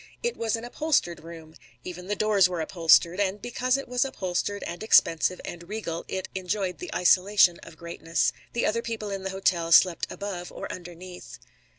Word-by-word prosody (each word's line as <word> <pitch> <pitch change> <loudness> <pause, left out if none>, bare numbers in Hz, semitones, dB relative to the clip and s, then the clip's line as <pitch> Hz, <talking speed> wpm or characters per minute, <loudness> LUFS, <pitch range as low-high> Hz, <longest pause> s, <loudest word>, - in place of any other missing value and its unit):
It 475 0 -1
was 225 0 -1
an 225 - -6
upholstered 245 - 0
room. 165 -1 -11 0.3
Even 180 0 -8
the 205 - -1
doors 205 -3 +3
were 180 -2 -3
upholstered. 170 +2 +3
And 200 0 0
because 250 +3 0
it 275 - -6
was 250 0 +1
upholstered 205 -5 -3
and 175 - -6
expensive 180 -4 +3
and 170 +1 -8
regal, 205 -6 -4
it 190 - -4
enjoyed 185 0 -2
the 360 - -7
isolation 185 0 +4
of 160 - -13
greatness. 170 0 -1 0.2
The 235 - 0
other 230 +2 0
people 220 -3 -5
in 195 -1 -4
the 190 - -4
hotel 185 -3 0
slept 170 +1 +5
above 185 -3 -6
or - - -7
underneath. 180 0 -10
185 Hz, 180 wpm, -26 LUFS, 175-215 Hz, 0.3 s, slept